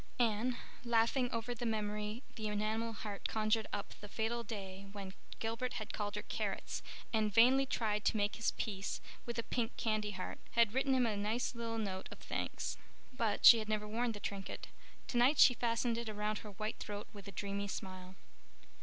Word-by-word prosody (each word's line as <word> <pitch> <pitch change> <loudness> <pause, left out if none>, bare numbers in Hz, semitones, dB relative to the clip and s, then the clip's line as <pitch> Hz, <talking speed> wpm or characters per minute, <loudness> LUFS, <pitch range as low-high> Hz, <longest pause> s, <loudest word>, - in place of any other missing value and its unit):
Anne, 235 +1 +2 0.3
laughing 235 +2 +3
over 230 +1 -2
the 240 - -6
memory 210 +1 -1
the 220 -2 -3
enamel 215 +2 0
heart 210 -2 -4
conjured 220 0 +1
up 205 -1 -3
the 205 - -7
fatal 230 +2 -1
day 195 -3 -6
when 195 -2 -6 0.2
Gilbert 230 +3 -2
had 215 - -4
called 205 -1 -2
her - - -3
"Carrots" - - -2 0.3
and 215 -1 +2
vainly 255 +5 +6
tried 215 -5 0
to - - +3
make 205 0 +1
his 230 - +2
peace 200 -2 -2 0.3
with 235 -1 -3
a 230 - 0
pink 230 -1 -1
candy 215 -2 +1
heart, 185 -2 -5
had 230 -2 +5
written 265 +1 +3
him 255 -1 +4
a 220 -2 +1
nice 215 +6 0
little 230 -1 -3
note 190 -4 -3
of - - -8
thanks. - - -3 0.4
But 225 -4 +1
she 230 - +12
had 215 -1 -4
never 210 -1 0
worn 230 +2 0
the 205 - -7
trinket. 195 -1 -5 0.4
Tonight 250 +4 +4
she 255 - +9
fastened 230 0 +1
it 235 -2 -4
about 210 0 -1
her 210 - -8
white 215 +3 -3
throat 205 -1 -5
with 205 -1 -10
a - - -6
dreamy 200 +1 -2
smile. 185 -1 -6
220 Hz, 190 wpm, -36 LUFS, 205-235 Hz, 0.4 s, she